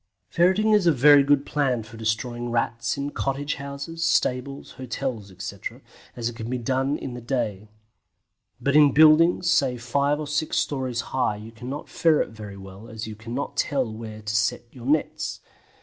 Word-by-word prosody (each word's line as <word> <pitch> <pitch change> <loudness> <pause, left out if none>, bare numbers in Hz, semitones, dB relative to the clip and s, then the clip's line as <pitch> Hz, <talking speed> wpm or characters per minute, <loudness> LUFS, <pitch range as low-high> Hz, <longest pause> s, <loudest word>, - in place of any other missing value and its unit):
Ferreting 190 +5 +3
is 205 -4 +4
a - - +7
very 145 +1 +7
good 140 0 +3
plan 130 -6 0
for 110 +1 -13
destroying 120 +2 -2
Rats 115 0 -1
in 140 +1 -3
cottage 140 +2 -2
houses, 140 +4 -5
stables, 140 -4 0
hotels, 125 -4 -4
etc., 95 +1 -7 0.4
as 120 -2 -2
it 120 - -4
can 115 0 -6
be 125 - -1
done 130 +4 0
in 130 - -6
the 120 - -7
day, 110 -5 -2 0.9
but 140 +1 0
in 145 -3 +7
buildings, 160 +4 +6
say 135 -7 +2
five 140 +5 0
or 155 - -3
six 150 +2 -1
storeys 130 -4 -1
high 130 -5 +1
you 110 +2 -10
cannot 125 +6 -7
ferret 160 -3 +2
very 105 -3 -9
well 95 +3 -11
as 110 -1 -6
you 110 -1 -7
cannot 115 +6 -5
tell 130 -7 0
where 110 -1 -8
to 105 0 -3
set 105 -1 +1
your 125 -1 -10
nets. 150 +1 0
130 Hz, 175 wpm, -25 LUFS, 115-145 Hz, 0.9 s, a